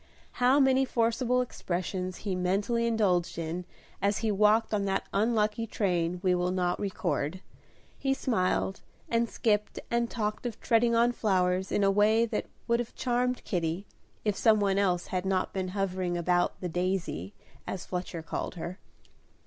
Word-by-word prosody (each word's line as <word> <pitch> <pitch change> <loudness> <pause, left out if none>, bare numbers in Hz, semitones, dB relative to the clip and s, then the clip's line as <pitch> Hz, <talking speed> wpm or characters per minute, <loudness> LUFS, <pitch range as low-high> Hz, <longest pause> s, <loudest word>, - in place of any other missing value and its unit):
How 255 +3 +5
many 265 -1 +4
forcible 250 0 +1
expressions 185 -5 -3
he 195 - 0
mentally 200 +6 +1
indulged 195 -8 +1
in 170 +2 -3 0.4
as 200 +1 +2
he 220 - +2
walked 215 +2 +3
on 200 -1 +1
that 195 -1 -1
unlucky 215 +1 +1
train 180 -5 0
we 185 -1 +3
will 180 0 +1
not 180 -1 0
record; 180 -4 -2 0.6
he 270 -1 +1
smiled 190 -6 0 0.3
and 230 0 +1
skipped 210 -2 0
and 235 0 +1
talked 215 +1 -2
of 230 -2 -7
treading 235 0 +3
on 235 +1 +4
flowers 190 -4 +1
in 205 - +2
a 195 - +4
way 215 +3 +4
that 230 - -3 0.2
would 235 0 +2
have 240 - -4
charmed 250 0 0
Kitty, 175 +1 -2 0.4
if 210 -2 +1
some 215 +1 +4
one 200 -1 +2
else 180 -3 +1
had 180 -1 0
not 190 -1 0
been 190 -1 -2
hovering 185 -2 -1
about 175 +1 +1
"The 180 - -2
Daisy," 175 - -2 0.3
as 190 - -4
Fletcher 180 -2 -4
called 165 - -4
her. 175 +2 -6
195 Hz, 160 wpm, -29 LUFS, 180-230 Hz, 0.6 s, How